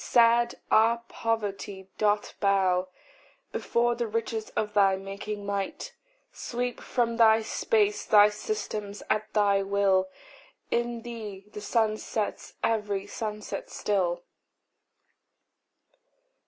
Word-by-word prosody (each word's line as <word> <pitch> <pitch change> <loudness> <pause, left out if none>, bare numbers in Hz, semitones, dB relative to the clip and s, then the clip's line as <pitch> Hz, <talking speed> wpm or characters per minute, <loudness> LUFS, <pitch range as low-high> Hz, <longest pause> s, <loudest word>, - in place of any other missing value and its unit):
Sad 235 0 +4 0.2
our 230 +2 +4
poverty 205 -4 -3
doth 210 -1 +1
bow 190 -2 +2 0.6
Before 240 0 +1
the 235 0 -2
riches 225 0 -3
of 210 -1 -1
thy 195 -2 +5
making 200 +2 -6
might: 200 -1 -3 0.4
Sweep 245 0 -3
from 235 -2 0
thy 220 -1 +6
space 420 - +1
thy 210 0 +6
systems 210 - -4
at 215 0 0
thy 200 -2 +4
will 195 -1 +2 0.6
In 235 -1 -1
thee 215 -5 -7
the 210 - -6
sun 215 0 +1
sets 215 -1 -4
every 210 -3 0
sunset 210 0 -5
still. 175 -4 -1
210 Hz, 105 wpm, -28 LUFS, 200-230 Hz, 0.6 s, thy